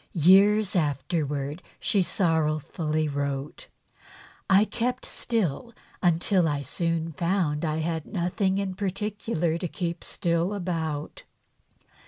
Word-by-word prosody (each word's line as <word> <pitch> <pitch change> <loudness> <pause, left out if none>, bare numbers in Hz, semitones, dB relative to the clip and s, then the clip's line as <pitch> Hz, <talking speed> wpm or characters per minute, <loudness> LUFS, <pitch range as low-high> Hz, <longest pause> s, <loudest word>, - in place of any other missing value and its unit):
Years 195 +4 +5
afterwards 145 0 -1 0.2
she 200 - +2
sorrowfully 155 -3 0
wrote: 140 0 -3 0.4
" - - -22
I 210 - +4
kept 250 +3 -2
still 225 - -2 0.3
until 175 0 +3
I 145 -2 -1
soon 165 +1 -1
found 170 -2 0
I 155 -1 0
had 160 -1 -2
nothing 190 +2 0
in 195 -1 -1
particular 195 -3 -2
to 180 - -2
keep 170 0 -4
still 170 +3 0
about. 160 -6 -3
170 Hz, 110 wpm, -26 LUFS, 155-195 Hz, 0.4 s, Years